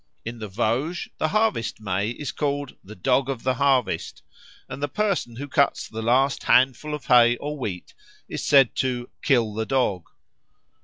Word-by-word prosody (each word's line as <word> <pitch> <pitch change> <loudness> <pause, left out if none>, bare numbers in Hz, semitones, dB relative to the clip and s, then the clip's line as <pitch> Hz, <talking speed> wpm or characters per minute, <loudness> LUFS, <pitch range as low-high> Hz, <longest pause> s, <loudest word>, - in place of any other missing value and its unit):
In 115 +1 -6
the 110 - -5
Vosges 120 - -1
the - - +1
Harvest 215 - 0
May 100 0 -1
is 140 +5 -5
called 145 -2 -3
the 105 +3 -11
"Dog 130 +6 +1
of 130 -4 -4
the 130 - +1
harvest," 135 0 0 0.4
and 140 - -8
the 145 - 0
person 185 - -1
who 140 +4 -6
cuts 140 0 +1
the 110 0 -6
last 130 +4 +2
handful 130 +4 +3
of 150 - -10
hay 120 -1 +5
or 150 +1 -5
wheat 100 -11 -6 0.3
is - - -5
said 135 -4 +5
to 125 -2 -2
"kill 115 -6 +2
the 110 +1 -3
Dog." 105 -9 0
130 Hz, 170 wpm, -24 LUFS, 115-140 Hz, 0.4 s, hay